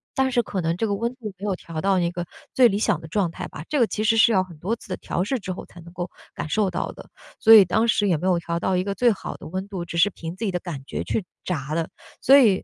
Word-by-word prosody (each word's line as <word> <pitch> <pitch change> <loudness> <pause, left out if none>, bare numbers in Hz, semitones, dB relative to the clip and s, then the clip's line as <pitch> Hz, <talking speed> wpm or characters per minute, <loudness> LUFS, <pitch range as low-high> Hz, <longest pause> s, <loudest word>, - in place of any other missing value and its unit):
但 265 -1 +2
是 240 - +3
可 200 -4 -3
能 165 0 -1
这 225 - 0
个 200 - 0
温 235 +4 -2
度 220 -6 -7
没 195 - -13
有 200 - +1
调 160 -2 -6
到 195 -1 +2
一 170 - +1
个 175 0 -4 0.3
最 250 -2 +6
理 200 - 0
想 210 -6 +1
的 160 - -10
状 185 0 +1
态 - - -6
吧， 150 - -9
这 300 - -1
个 240 - +5
其 215 0 -2
实 225 +1 +4
是 225 +1 +6
要 190 - +4
很 180 -4 -8
多 190 +9 -2
次 - - -15
的 185 - -3
调 - - -3
试 265 +5 0
之 190 -5 -5
后 180 - -6
才 175 - -14
能 170 - -13
够 175 0 -5 0.2
感 - - -5
受 205 +3 +1
到 - - -2
的， - - -13 0.3
所 225 - +7
以 210 -3 +10
当 220 +6 +2
时 210 -2 +3
也 180 - +3
没 160 +4 -3
有 180 -2 +3
调 170 0 -3
到 185 +2 0
一 185 - 0
个 200 - -2
最 245 +1 +4
好 200 - -5
的 - - -10
温 185 +4 -4
度， 190 -4 -5
只 170 0 -6
是 175 +5 +5
凭 165 -3 -7
自 225 - -3
己 200 - 0
的 180 - -1
感 165 -7 -6
觉 - - -3
去 210 - -2 0.2
炸 150 -5 -3
了。 165 0 -1 0.3
所 270 +2 +7
以 215 -8 +4
190 Hz, 335 characters per minute, -24 LUFS, 170-220 Hz, 0.3 s, 以